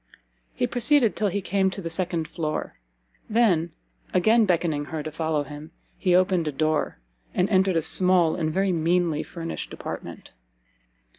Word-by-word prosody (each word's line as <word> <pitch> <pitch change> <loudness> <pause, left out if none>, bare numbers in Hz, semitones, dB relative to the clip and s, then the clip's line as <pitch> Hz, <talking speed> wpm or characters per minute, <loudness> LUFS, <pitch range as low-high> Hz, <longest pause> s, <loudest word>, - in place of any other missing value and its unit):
He - - +1
proceeded 245 -1 +2
till 215 - 0
he 200 +1 -2
came 190 0 +1
to 190 - -6
the 170 - -5
second 170 -2 -1
floor, 155 - -4 0.5
then, 195 -8 +2 0.4
again 220 +4 +4
beckoning 165 -5 0
her 155 +1 -5
to 155 - -5
follow 160 -1 -1
him, 150 +2 -10 0.3
he 180 -3 +2
opened 180 -3 +2
a - - 0
door, 155 - -1 0.4
and 180 - +2
entered 190 -2 +3
a 160 - +1
small 180 0 +4
and 155 -2 -1
very 195 +3 +1
meanly 170 -1 +1
furnished 165 0 -6
apartment. - - -8
175 Hz, 155 wpm, -25 LUFS, 160-190 Hz, 0.5 s, again